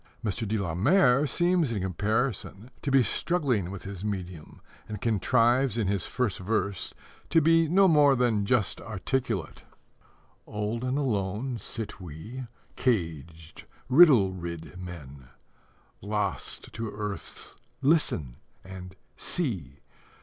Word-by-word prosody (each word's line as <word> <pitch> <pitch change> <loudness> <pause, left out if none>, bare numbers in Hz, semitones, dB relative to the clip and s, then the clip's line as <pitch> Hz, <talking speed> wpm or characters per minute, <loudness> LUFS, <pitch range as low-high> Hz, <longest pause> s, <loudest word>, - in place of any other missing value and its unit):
Mr. 110 +2 -2
de 110 +2 0
la 90 -5 -2
Mare 135 - +4
seems 175 -1 +2
in 100 -4 -2
comparison 110 +4 -2
to - - -2
be 135 -1 +5
struggling 125 - 0
with 100 -1 -7
his 95 -1 -7
medium, 90 -6 -5 0.3
and 105 -2 -5
contrives 120 +3 +2
in 110 - +1
his 100 -2 0
first 125 -7 -1
verse 100 -1 -1 0.4
to 165 - +5
be 165 +1 +4
no 190 +4 +5
more 145 -4 +5
than 120 -5 +2
just 105 -2 +1
articulate: 110 - -3 0.9
Old 105 +3 -3
and 130 +2 0
alone, 115 -1 -1
sit 105 -4 -6
we, 105 - -8 0.3
Caged, 85 - -2 0.2
riddle 130 - +7
rid 85 -1 -7
men, 70 -8 -9 0.7
Lost 100 -1 -3
to 115 -1 -4
earth's 105 -1 -6 0.3
"Listen!" 110 - +2 0.3
and 95 0 -9 0.2
"See!" 90 - -3
105 Hz, 120 wpm, -28 LUFS, 95-130 Hz, 0.9 s, riddle